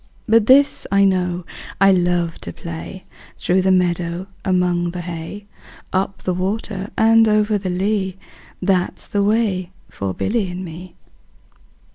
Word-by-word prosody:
20 - - -6
But 215 - -4
this 280 +2 +5
I 200 0 +5
know, 180 -2 0 0.3
I 195 0 +6
love 175 -2 +1
to - - -5
play 170 +3 -8 0.3
Through 185 +1 +1
the 190 +1 +2
meadow, 175 -1 0 0.2
among 180 -2 +1
the 175 +1 -5
hay; 175 +4 -7 0.5
Up 190 +1 -1
the 185 - 0
water 190 +1 -3
and 225 0 +5
over 210 0 +2
the 190 -1 -4
lea, 190 +1 -1 0.5
That 185 -1 +1
's - - -8
the 205 - -1
way 200 -4 +1 0.2
for 95 -1 -4
Billy 210 -2 -1
and 180 +1 -5
me. 175 +2 -10
185 Hz, 150 wpm, -20 LUFS, 175-200 Hz, 0.5 s, I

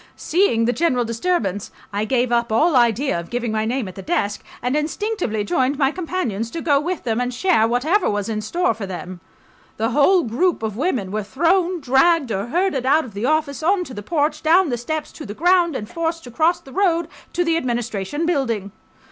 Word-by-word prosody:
Seeing 315 - +2
the 245 - +1
general 255 -4 +1
disturbance, 230 - -1 0.2
I 205 +1 -1
gave 250 +1 +1
up 235 -1 +1
all 305 +8 +3
idea 240 -2 +2
of 170 - -8
giving 240 -2 -2
my 215 0 0
name 240 -1 -1
at 185 - -8
the 195 - -8
desk, 205 - -1 0.2
and 250 +3 -1
instinctively 300 - -1
joined 260 +6 0
my 275 -2 +2
companions, 315 - -3
to 330 - -5
go 285 -3 +3
with 345 +4 -3
them 230 0 0
and 250 0 -1
share 250 -3 +2
whatever 310 - +1
was 205 -1 -2
in 215 -1 -2
store 340 +6 0
for 210 -2 -6
them. 180 0 -7 0.6
The 225 +3 0
whole 335 +7 +4
group 270 +5 0
of 215 -2 -2
women 245 - -1
were 215 +1 -1
thrown, 345 - +1
dragged 270 +1 +3
or 200 +2 -2
herded 340 -1 0
out 310 +4 +4
of 230 - -11
the 205 +5 -2
office 305 -3 0
on 365 +3 +2
to 265 - -10
the 205 - -6
porch, 300 +5 -1
down 335 +2 +4
the 245 - 0
steps 310 +5 -4
to 310 - -9
the 205 - -7
ground, 350 0 +3
and 210 -4 -4
forced 330 +1 -3
to 245 - -10
cross 330 +6 +2
the 270 - -15
road... 345 -4 +1 0.3
to 355 - +1
the 330 -1 +1
Administration 240 - -2
Building. 235 - -1
265 Hz, 210 wpm, -21 LUFS, 225-335 Hz, 0.6 s, whole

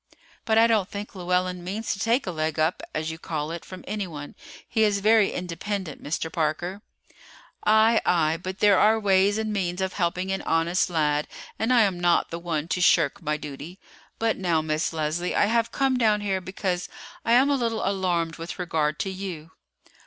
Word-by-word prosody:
"But 220 -1 +2
I 225 - +7
don't 215 -4 +2
think 205 +1 -7
Llewellyn 180 -1 -1
means 205 +5 -3
to 190 - -8
take 235 +5 +1
a 185 - -2
leg 155 -1 -2
up, 155 +3 +1
as 155 +1 -3
you 160 - -8
call 155 -2 -4
it, 170 0 -6
from 185 -1 -11
anyone; 170 -9 -5 0.3
he 220 - +1
is 205 -2 +2
very 215 0 +4
independent, 180 -1 -4
Mr. 160 +2 -3
Parker." 175 +5 -2 0.9
"Aye, 220 +1 +5
aye; 160 -2 +2
but 185 +2 -6
there 205 -2 +5
are 220 +1 +4
ways 200 0 +3
and 220 -1 -2
means 180 -3 -2
of 190 0 -1
helping 180 +1 -1
an 190 - -1
honest 165 +3 +1
lad, 150 -3 +1 0.3
and 225 +3 +1
I 245 -2 +6
am 195 -4 +1
not 175 -1 +2
the 170 - -4
one 165 -3 -3
to 180 - -1
shirk 155 -4 +3
my 150 0 -1
duty. 150 +4 -8 0.4
But 225 -1 0
now, 175 -4 +1
Miss 155 +1 -1
Leslie, 160 +2 -2
I - - +4
have 230 +2 +1
come 270 -2 +1
down 215 -3 +2
here 195 -2 -1
because 185 -1 -3 0.3
I 230 - +2
am 265 +4 +5
a - - +3
little 230 -5 -1
alarmed 175 -4 0
with 165 +1 -7
regard 160 -4 -1
to 195 - -2
you." 185 -5 -7
185 Hz, 195 wpm, -25 LUFS, 165-210 Hz, 0.9 s, I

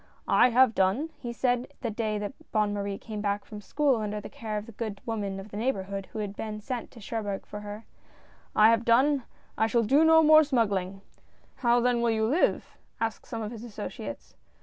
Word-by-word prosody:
"I 250 - +5
have 250 0 +5
done," 220 +13 +1
he 240 -3 -5
said 245 +2 0
the 235 -4 -2
day 215 -1 -1
that 205 -1 -4 0.2
Bonne 210 -1 +1
Marie 200 -1 -3
came 215 -1 -6
back 200 0 -1
from 210 -1 -9
school 280 +4 +1
under 210 -1 -3
the 205 - -8
care 215 -2 -4
of 210 - -5
the 230 - -11
good 215 -2 -5
woman 205 -4 -3
of 195 +2 -9
the 205 - -7
neighborhood 200 -5 -2
who - - -10
had 205 -2 -4
been 215 0 -5
sent 245 +2 -5
to 240 - -14
Cherbourg 205 -2 -4
for 210 - -7
her, 210 +1 -8 0.4
" - - -28 0.3
I 215 +1 +7
have 230 0 +2
done 260 +3 +3
— - - -34
I 220 - +4
shall 230 +1 +2
do 275 +8 +4
no 320 0 +6
more 310 0 +8
smuggling! 200 -9 0
" - - -36
" - - -33
And - - -33 0.3
how 240 -1 +3
then 245 -1 +2
will 235 - +2
you 220 -1 +1
live? 285 +11 0
" - - -40
asked 225 -1 -3
some 230 -3 -4
of 215 - -5
his 230 -1 -8
associates. 230 -4 -7
220 Hz, 235 wpm, -28 LUFS, 205-245 Hz, 0.4 s, more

